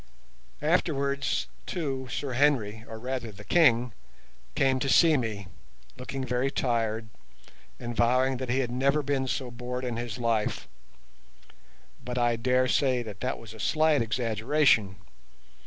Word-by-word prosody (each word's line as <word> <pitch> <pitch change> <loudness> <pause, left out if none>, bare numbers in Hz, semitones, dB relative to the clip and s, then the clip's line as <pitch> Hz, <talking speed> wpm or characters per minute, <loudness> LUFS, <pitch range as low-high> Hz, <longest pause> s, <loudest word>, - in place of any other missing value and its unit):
Afterwards, 140 - +1 0.2
too, 135 -6 -3
Sir 135 0 -3
Henry, 120 -6 +1
or 110 - -7
rather 125 -1 -4
the 105 0 -12
King, 125 -6 +3 0.6
came 135 -1 +2
to 135 - -1
see 160 +2 +6
me, 110 -6 -2 0.5
looking 130 +1 -5
very 125 +2 0
tired, 115 -4 -1 0.7
and 120 0 -5
vowing 125 +3 +2
that 130 0 -5
he 130 +2 +2
had 120 -2 -3
never 140 +4 +1
been 135 -1 -1
so 130 -1 -3
bored 125 +1 -5
in 120 -2 -3
his 120 -1 -4
life; 115 -3 -1 1.4
but 125 0 -5
I 120 -1 +2
dare 125 +2 +2
say 130 -1 +2
that 105 -4 -9
that 130 - -2
was 115 -1 -11
a 110 - -13
slight 155 +4 +2
exaggeration. 115 -1 +2
125 Hz, 140 wpm, -28 LUFS, 115-135 Hz, 1.4 s, see